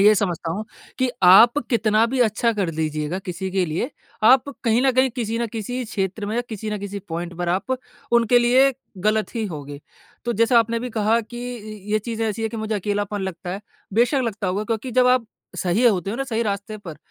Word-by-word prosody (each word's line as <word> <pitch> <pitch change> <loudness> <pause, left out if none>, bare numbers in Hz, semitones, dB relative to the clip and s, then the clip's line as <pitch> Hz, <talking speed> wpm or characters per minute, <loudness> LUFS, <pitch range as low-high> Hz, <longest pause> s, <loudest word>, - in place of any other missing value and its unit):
ये 210 +2 +7
समझता 175 -4 -1
हूँ 210 +5 -4 0.3
कि 255 -1 +2
आप 225 +9 +8
कितना 220 -1 +3
भी 255 +1 -1
अच्छा 230 +1 +2
कर 195 -6 -1
लीजिएगा 155 +2 -2
किसी 190 0 -5
के 185 -1 +1
लिए, 170 - -2 0.3
आप 255 +4 +6 0.2
कहीं 230 +2 +3
न - - +6
कहीं 260 0 +3
किसी 230 -1 -2
न 235 - 0
किसी 245 +3 -3
क्षेत्र 200 0 -3
में 215 - -3
या 245 - +1
किसी 220 -1 -5
ना 210 - -2
किसी 200 0 -5
पॉइंट 170 +1 -4
पर 175 -1 -1
आप 195 +9 0 0.4
उनके 235 +1 +5
लिए 255 +3 +4 0.3
गलत 215 +2 +1
ही 225 -2 -1
होगे। 145 -4 -7 0.4
तो 240 - 0
जैसा 230 +2 +4
आपने 230 0 +1
अभी 245 +1 -3
कहा 220 +2 +3
कि 245 +2 -7
इ 215 -1 -9 0.2
ये 215 - +4
चीज़ 225 +1 -4
ऐसी 220 0 -2
है 225 - 0
कि 230 - -7
मुझे 220 0 -2
अकेलापन 205 0 -2
लगता 180 -1 -5
है, 195 +3 -4 0.3
बेशक 245 +4 +3
लगता 205 -3 -3
होगा 195 +3 -1
क्योंकि 225 +3 -3
जब 250 +1 +4
आप 250 -2 +3 0.3
सही 190 +7 +1
होते 195 -3 +2
हो 230 - -3
ना 270 - -2
सही 230 -3 -1
रास्ते 205 0 -3
पर 165 -6 -9
215 Hz, 220 wpm, -22 LUFS, 195-235 Hz, 0.4 s, आप